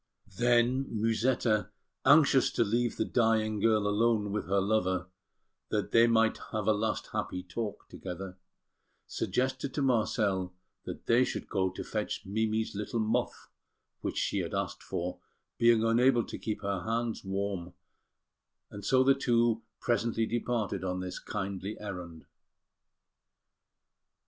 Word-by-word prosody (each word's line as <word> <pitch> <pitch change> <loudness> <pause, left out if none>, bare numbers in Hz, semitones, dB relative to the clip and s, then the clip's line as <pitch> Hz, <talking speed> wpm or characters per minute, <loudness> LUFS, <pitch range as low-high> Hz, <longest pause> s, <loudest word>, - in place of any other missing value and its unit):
Then 120 +2 +3
Musetta, 115 0 +1 0.4
anxious 140 -1 +6
to - - +3
leave 120 +2 0
the 110 - +1
dying 110 -3 +1
girl 110 -1 +3
alone 105 0 +2
with 105 - -3
her 100 +1 +2
lover, 95 -3 0 0.6
that - - -1
they 115 +1 +6
might 115 -1 +3
have 110 -2 -2
a 110 - +5
last 110 +1 -2
happy 90 - -3
talk 105 +3 -5
together, 95 0 -7 0.7
suggested 130 +1 -2
to 145 - 0
Marcel 105 -7 +1 0.3
that - - -7
they 120 +2 +4
should - - -4
go 95 -2 0
to 95 - -6
fetch 105 -1 -3
Mimi's 110 +2 -1
little 105 +3 -3
muff, 115 +3 -1 0.5
which - - -4
she - - 0
had - - -3
asked - - -3
for, 90 +1 -4 0.4
being 115 -1 +5
unable 120 +2 +4
to - - -7
keep 110 - -4
her 100 -2 -1
hands 115 +1 -2
warm; 95 -2 -3 1.0
and 100 -1 -8
so 130 +5 +4
the 135 +1 +6
two 120 -3 +2 0.2
presently 115 -1 0
departed 110 -5 -2
on 90 0 -2
this 90 0 -5
kindly 100 0 -4
errand. 90 -6 -7
110 Hz, 135 wpm, -30 LUFS, 100-120 Hz, 1.0 s, anxious